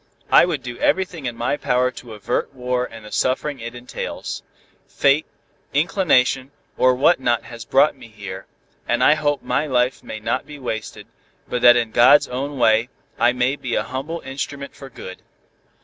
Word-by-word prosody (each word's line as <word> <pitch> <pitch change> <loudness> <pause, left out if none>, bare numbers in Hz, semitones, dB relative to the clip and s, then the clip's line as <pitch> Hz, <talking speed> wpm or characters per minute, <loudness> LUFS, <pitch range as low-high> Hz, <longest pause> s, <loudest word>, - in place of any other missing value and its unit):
I - - +7
would 160 -6 -3
do 120 -1 -7
everything 180 -7 0
in 120 - -4
my 120 +5 -1
power 125 -2 +1
to 120 -3 -10
avert 105 +5 -2
war 125 0 -1
and 115 -1 -11
the 105 - -11
suffering 135 +2 -1
it 115 +1 -7
entails. 120 +1 -6 0.5
Fate, 140 +2 +2 0.5
inclination, 140 -5 +2 0.3
or 130 0 +4
what 145 +6 +4
not 120 -3 +1
has 115 -2 -10
brought 135 +8 +3
me - - -13
here, 100 -3 -9 0.4
and - - +1
I - - +7
hope 145 -1 -1
my 155 - 0
life 125 -1 0
may 110 - -7
not 120 +4 -2
be 150 -1 -9
wasted, 110 -5 -5 0.4
but 125 - -2
that 120 0 +8
in 115 -2 -1
God's 125 +6 +6
own 140 +3 -4
way, 115 0 +3 0.3
I 120 +1 +5
may 125 +2 0
be 125 -4 -4
a - - +1
humble 140 +6 -5
instrument 140 +1 -6
for 135 - -11
good. 95 -7 -10
125 Hz, 180 wpm, -21 LUFS, 120-140 Hz, 0.5 s, that